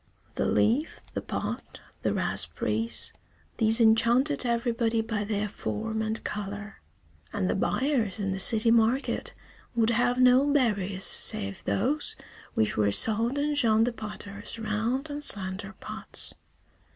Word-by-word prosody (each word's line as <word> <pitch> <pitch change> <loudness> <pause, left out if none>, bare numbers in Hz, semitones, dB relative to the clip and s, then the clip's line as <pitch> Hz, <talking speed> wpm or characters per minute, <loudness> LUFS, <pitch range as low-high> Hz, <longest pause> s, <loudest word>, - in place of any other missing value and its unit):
The - - -1
leaf, 255 +9 0
the - - -3
pot, - - -6 0.2
the - - 0
raspberries, 225 +2 0 0.4
these 225 0 +2
enchanted 240 +5 +3
everybody 235 -1 0
by 220 -2 -3
their 210 0 -2
form 205 - -4
and 220 +1 -3
color; 205 0 -6 0.5
and 95 - -2
the 90 - 0
buyers 245 - -1
in 195 -1 -2
the 190 - -3
city 225 +3 +7
market 235 +4 +2 0.4
would 230 -1 +2
have 245 +2 +1
no 255 +3 +4
berries 200 -8 0
save 100 0 0
those 295 - 0 0.4
which 110 - 0
were 105 -1 +2
sold 225 - +4
in 295 +1 0
Jean 225 -6 +2
the 240 +1 -1
potter's 210 -1 -8
round 225 +7 -2
and 290 +1 -5
slender 195 -2 -2
pots. - - -1
225 Hz, 135 wpm, -27 LUFS, 205-245 Hz, 0.5 s, city